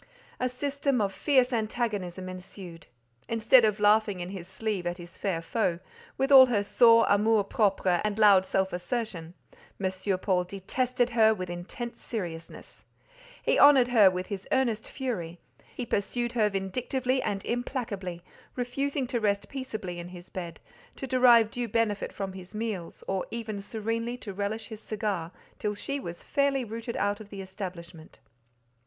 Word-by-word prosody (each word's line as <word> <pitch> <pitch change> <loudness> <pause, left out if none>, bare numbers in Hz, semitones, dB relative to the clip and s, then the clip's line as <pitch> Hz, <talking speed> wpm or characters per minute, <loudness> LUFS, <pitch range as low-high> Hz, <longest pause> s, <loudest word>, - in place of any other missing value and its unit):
A 255 - 0
system 280 0 -1
of 200 -2 0
fierce 260 -3 +2
antagonism 210 -5 -2
ensued. 185 -2 -9 0.4
Instead 230 +2 +5
of 210 -1 +2
laughing 210 -2 +3
in 175 0 -5
his 185 -3 -7
sleeve 195 -2 -3
at 175 0 -2
his 175 0 -11
fair 175 -5 -2
foe, 180 -2 0 0.4
with 270 +1 0
all 260 -1 +10
her 215 -5 +1
sore 230 +2 +6
amour 210 +1 +3
propre 195 -4 +1
and 210 -1 -1
loud 205 -3 +6
self 190 0 0
assertion, 180 -3 -4 0.4
M. 190 0 -1
Paul 185 -1 +1
detested 245 +6 -1
her 220 -1 +5
with 185 -3 -5
intense 190 +7 -7
seriousness; 170 -7 -7 0.6
he - - +2
honoured 270 -4 +7
her 215 -6 +7
with 185 0 -3
his 200 -1 -6
earnest 235 -5 +1
fury; 180 - -4 0.4
he 245 - -4
pursued 240 +3 -1
her 220 -3 +2
vindictively 250 +7 -1
and 195 -4 -3
implacably, 220 -8 -3 0.3
refusing 270 +3 -1
to 245 -1 -2
rest 200 -2 0
peaceably 220 -10 -5
in 175 - -7
his 180 0 -11
bed, 175 -3 -6 0.4
to - - -5
derive 245 -4 +5
due 245 -1 -3
benefit 215 -2 0
from 195 -1 -5
his 190 +2 -10
meals, 210 -6 -4
or 190 -1 -2
even 220 -3 -5
serenely 230 +3 -3
to 210 -5 -7
relish 205 +3 -3
his 220 -1 -8
cigar, 205 -7 -3 0.3
till 210 -1 -2
she 280 +7 -4
was 170 -9 -7
fairly 280 -2 +1
rooted 230 +1 -5
out 205 +1 0
of 215 -2 -11
the 195 -2 -7
establishment. 180 -4 -8
210 Hz, 160 wpm, -28 LUFS, 185-240 Hz, 0.6 s, all